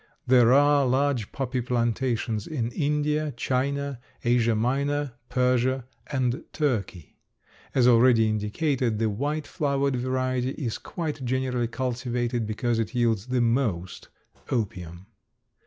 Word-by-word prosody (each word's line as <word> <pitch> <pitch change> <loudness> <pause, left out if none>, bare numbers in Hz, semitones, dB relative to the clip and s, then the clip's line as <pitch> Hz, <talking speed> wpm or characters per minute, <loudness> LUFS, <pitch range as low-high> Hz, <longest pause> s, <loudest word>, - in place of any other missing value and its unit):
There 125 -2 +5
are 145 +1 +5
large 130 -3 +1
poppy 130 -2 -2
plantations 115 -2 -1
in 120 -7 -2
India, 150 0 0
China, 140 +1 -1 0.2
Asia 120 -2 +3
Minor, 140 +4 0 0.2
Persia, 125 0 +1 0.2
and 130 -3 -1
Turkey. 105 - -2 0.6
As 125 -2 +5
already 115 -2 +5
indicated, 110 +3 0
the 110 0 +1
white 145 +8 -2
flowered 140 -3 0
variety 130 +1 -1
is 120 -7 -4
quite 155 -6 -5
generally 125 -1 0
cultivated 120 -1 -2
because 115 +2 -1
it 115 +2 -3
yields 115 -3 +1
the 125 -1 +1
most 115 -8 -1 0.4
opium. 90 -7 -3
125 Hz, 115 wpm, -26 LUFS, 115-135 Hz, 0.6 s, There